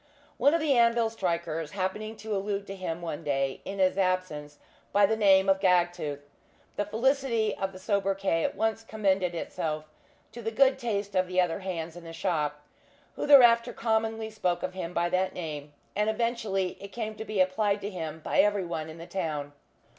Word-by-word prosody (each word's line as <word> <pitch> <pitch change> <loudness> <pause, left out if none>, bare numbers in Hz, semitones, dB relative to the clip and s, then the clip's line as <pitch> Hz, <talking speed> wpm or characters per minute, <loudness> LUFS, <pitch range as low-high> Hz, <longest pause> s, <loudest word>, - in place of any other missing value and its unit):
One 285 +3 +4
of - - +2
the 305 -3 +3
anvil 235 -1 +3
strikers 170 -6 -2
happening 210 +3 -3
to 215 0 -4
allude 200 0 -2
to 195 - -7
him 175 -3 -4
one 165 -3 -4
day 135 -1 -1
in 195 - -5
his 190 0 +2
absence 185 -6 -1 0.3
by 205 0 +5
the 220 +3 +1
name 195 -3 +5
of 195 0 +4
"Gagtooth," 175 -6 +1 0.5
the 205 - -1
felicity 230 -1 +1
of 195 0 -3
the 185 - -11
sobriquet 195 -3 0
at - - -1
once 225 0 0
commended 195 -5 0
itself 155 -2 -3 0.5
to 235 +2 -8
the 225 - -2
good 265 +3 +3
taste 205 -5 -2
of 185 -1 +2
the 185 0 0
other 180 0 +1
hands 170 -4 -4
in 175 - -10
the 165 0 -9
shop, 150 -4 -2 0.5
who - - -3
thereafter 240 -5 +7
commonly 220 -1 -1
spoke 180 -5 -1
of 185 - -3
him 180 -2 -5
by 175 0 +1
that 185 +1 0
name, 150 -4 -5 0.2
and 210 +1 +1
eventually 220 -5 -1
it 200 - -6
came 220 -1 -4
to 215 - -7
be 215 -2 -3
applied 200 +2 +2
to 205 - -4
him 160 -3 -5
by - - 0
every 205 -2 +3
one 160 -2 -4
in 160 - -9
the 165 - -8
town. 150 -6 -3
190 Hz, 190 wpm, -28 LUFS, 170-220 Hz, 0.5 s, thereafter